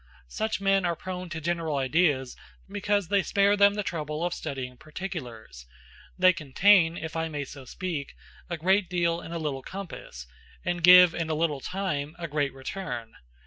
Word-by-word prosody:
Such 220 - -2
men 195 -1 +2
are 170 -1 0
prone 185 +1 -6
to 160 -1 -5
general 165 -1 -1
ideas 135 -1 +1 0.3
because 205 -2 -1
they 200 -1 +3
spare 200 +1 +3
them 200 0 +5
the 210 - -1
trouble 155 -2 -3
of 175 - -1
studying 130 -5 -5
particulars; 125 - -8 0.5
they 185 0 +6
contain, 170 +3 +4
if 160 0 -6
I 165 0 -1
may 145 -2 -4
so 135 0 -11
speak, 165 -1 -5 0.3
a 170 - -3
great 190 +3 +2
deal 170 -1 0
in 165 - -9
a 170 - -3
little 150 -4 -3
compass, 165 - -8 0.4
and 175 0 -1
give, 180 0 +9
in 165 -1 -3
a 155 - 0
little 150 -3 0
time, 155 -5 -3
a 170 -1 -5
great 145 -2 -1
return. 130 -4 -6
170 Hz, 175 wpm, -27 LUFS, 145-185 Hz, 0.5 s, give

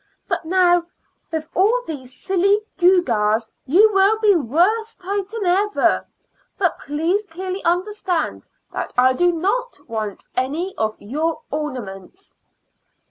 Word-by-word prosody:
"But - - -2
now, 350 0 +3 0.4
with 315 -1 -3
all 450 +7 +3
these 260 -5 -7
silly 390 +7 +1 0.2
gewgaws, 230 - +3 0.2
you 410 +10 +5
will 390 +3 +4
be 430 -2 +4
worse 365 - +1
titan 400 +3 -3
ever. 395 +4 +2 0.5
But 365 -4 0
please 330 +8 -1
clearly 370 +2 -5
understand 360 0 -1 0.3
that - - -4
I 255 +1 +5
do 355 +6 +3
not 405 +9 -1
want 215 -4 -4
any 310 +9 -2
of 220 0 -2
your 310 +8 -2
ornaments." 260 - -6
350 Hz, 120 wpm, -21 LUFS, 285-395 Hz, 0.5 s, you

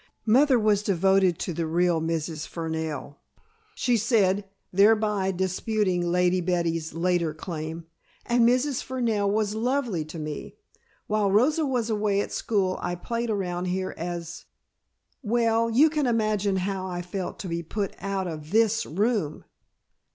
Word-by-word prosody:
"Mother 260 +4 +5
was 210 -2 +2
devoted 190 -2 +3
to 180 - -3
the 165 0 -2
real 170 0 +2
Mrs. 160 -1 -3
Fernell," 160 -4 -4 0.6
she 245 -2 +2
said, 205 -3 +2 0.3
thereby 210 0 +3
disputing 190 +1 0
Lady 180 +1 +2
Betty's 165 -3 -1
later 170 -2 0
claim, 160 0 -6 0.4
"and 240 0 +3
Mrs. 255 +2 +1
Fernell 230 -6 0
was 210 0 0
lovely 235 - 0
to 155 +2 -9
me. 150 -1 -6 0.5
While 210 -1 +1
Rosa 280 +10 +3
was 240 -4 -1
away 205 -2 +1
at - - -2
school 190 -4 0
I 175 0 -2
played 235 +6 -3
around 180 -4 -2
here 185 +1 -2
as 170 0 -6 0.8
well 230 -1 +2
you 260 +8 +5
can 305 -3 0
imagine 215 -4 +1
how 190 0 -2
I 175 -1 -4
felt 180 +1 -5
to 195 - -6
be 170 0 -2
put 195 +4 -3
out 195 0 -2
of 155 -2 -7
this 225 +2 +2
room!" 200 -2 -1
195 Hz, 145 wpm, -26 LUFS, 175-220 Hz, 0.8 s, Mother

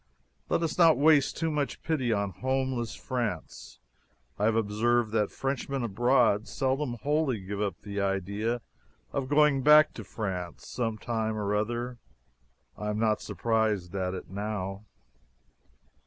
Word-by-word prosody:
Let 170 - +1
us 165 +2 -2
not 165 -2 +7
waste 145 -1 +4
too 165 -1 0
much 145 -2 -2
pity 130 -7 0
on 100 -2 0
"homeless" 130 +4 -2
France. 115 - -4 0.6
I 105 - +2
have 110 0 +3
observed 115 +1 +1
that 110 -2 +1
Frenchmen 135 -1 -2
abroad 115 -1 +2
seldom 135 -1 -1
wholly 145 -5 +1
give 100 +2 -5
up 100 -5 -2
the 100 -1 -3
idea 100 +5 -1 0.5
of 130 - -2
going 145 -2 +4
back 150 +2 +7
to - - -7
France 90 -6 -5
some 115 -3 -2
time 110 -1 -2
or 105 -1 -1
other. 120 +3 -2 0.8
I 105 - -4
am 105 - -1
not 110 -1 +1
surprised 110 -6 0
at 95 -1 -2
it 90 - -7
now. 100 +1 -4
115 Hz, 140 wpm, -28 LUFS, 105-130 Hz, 0.8 s, not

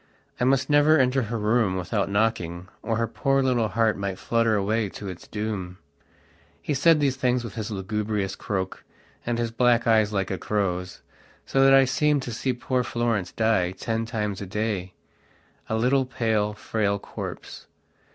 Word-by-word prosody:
I 125 - +2
must 135 +1 +2
never 150 +1 +5
enter 130 0 +3
her 115 0 -3
room 105 -2 +1
without 100 +2 -1
knocking, 95 -5 -1
or 115 -2 -1
her 115 - +1
poor 135 +3 +1
little 125 -4 +2
heart 110 0 +1
might 100 -1 -3
flutter 115 0 +1
away 105 +1 0
to 100 - -8
its 90 -2 -8
doom. 105 -4 -4 0.8
He 150 - -2
said 150 +3 +4
these 135 -3 +1
things 125 -2 +1
with 115 - -7
his 110 -2 -4
lugubrious 105 0 -2
croak, 95 -2 -4 0.4
and 120 -1 0
his 115 -1 -1
black 120 0 +3
eyes 110 -2 +3
like 95 -2 -1
a 95 - -3
crow's, 90 -3 -2 0.4
so 135 - +2
that 135 0 +7
I 135 0 +6
seemed 145 +2 +1
to 120 - -5
see 130 +3 -1
poor 125 0 -1
Florence 115 -7 -1
die 105 -5 +1
ten 115 +3 -3
times 105 -4 -3
a 100 - -5
daya 100 -2 -2 0.8
little, 125 +4 +2
pale, 110 -5 0
frail 105 -1 -1
corpse. - - -8
110 Hz, 170 wpm, -25 LUFS, 100-125 Hz, 0.8 s, that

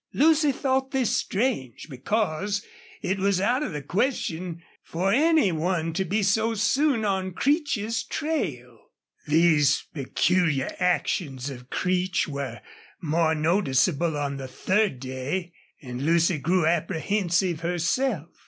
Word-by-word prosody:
Lucy 310 0 +4
thought 265 0 0
this 265 -4 0
strange, 195 - -2
because 200 - -2 0.4
it 190 +1 -1
was 195 -1 +2
out 245 +8 +1
of - - -2
the 150 -3 -5
question 175 - -2 0.2
for 185 +4 -1
any 310 - +4
one 165 0 -1
to 190 - 0
be 200 +4 0
so 220 +3 +2
soon 235 +2 +2
on 190 -2 -1
Creech's 240 - 0
trail. 140 - -4 0.4
These 150 -2 +3
peculiar 155 0 0
actions 150 -6 -1
of 125 -1 -11
Creech 185 0 0
were 140 -2 -5 0.4
more 160 0 +1
noticeable 160 -1 +1
on 140 -1 -2
the 135 -1 -6
third 190 - 0
day, 135 +8 -4 0.3
and 125 0 -5
Lucy 165 +1 +2
grew 175 +3 +1
apprehensive 175 +1 0
herself. 175 - -1
180 Hz, 125 wpm, -25 LUFS, 155-210 Hz, 0.4 s, Lucy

